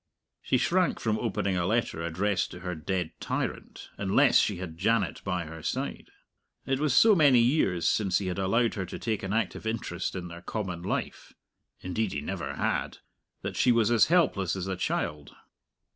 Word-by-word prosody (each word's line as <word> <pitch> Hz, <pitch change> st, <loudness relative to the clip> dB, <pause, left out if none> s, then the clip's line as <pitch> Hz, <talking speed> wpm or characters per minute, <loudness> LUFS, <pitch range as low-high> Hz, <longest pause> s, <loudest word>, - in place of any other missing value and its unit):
She 130 Hz, -, +1 dB
shrank 180 Hz, +7 st, +1 dB
from 110 Hz, -1 st, 0 dB
opening 100 Hz, -4 st, -1 dB
a 90 Hz, -, 0 dB
letter 110 Hz, -7 st, 0 dB
addressed 90 Hz, +4 st, 0 dB
to 90 Hz, -, -10 dB
her 90 Hz, 0 st, -3 dB
dead 90 Hz, +1 st, -2 dB
tyrant, -, -, -4 dB
unless -, -, +4 dB
she -, -, +1 dB
had 85 Hz, -3 st, -6 dB
Janet 105 Hz, -1 st, +1 dB
by 90 Hz, -3 st, -2 dB
her 80 Hz, +1 st, -9 dB
side. -, -, -4 dB, 0.6 s
It 135 Hz, 0 st, 0 dB
was 150 Hz, -4 st, +1 dB
so 220 Hz, -1 st, +7 dB
many 145 Hz, -8 st, +5 dB
years 115 Hz, -, +2 dB
since 95 Hz, -4 st, +2 dB
he 100 Hz, -, -3 dB
had 95 Hz, +1 st, -2 dB
allowed 115 Hz, +5 st, +2 dB
her 95 Hz, -3 st, -3 dB
to -, -, -6 dB
take 110 Hz, -3 st, -2 dB
an 95 Hz, -, -4 dB
active 110 Hz, 0 st, -1 dB
interest 95 Hz, -6 st, -3 dB
in 90 Hz, -1 st, -5 dB
their 85 Hz, 0 st, -9 dB
common 90 Hz, -4 st, -4 dB
life 90 Hz, -, -4 dB, 0.5 s
(indeed 95 Hz, +2 st, -2 dB
he 75 Hz, -, -3 dB
never -, -, -4 dB
had) -, -, -1 dB, 0.5 s
that -, -, -4 dB
she 125 Hz, -, +4 dB
was 115 Hz, -1 st, +3 dB
as 115 Hz, -2 st, +5 dB
helpless 125 Hz, -, +2 dB
as 95 Hz, -2 st, -3 dB
a 95 Hz, -1 st, -2 dB
child. 75 Hz, -4 st, -3 dB
95 Hz, 185 wpm, -28 LUFS, 90-115 Hz, 0.6 s, so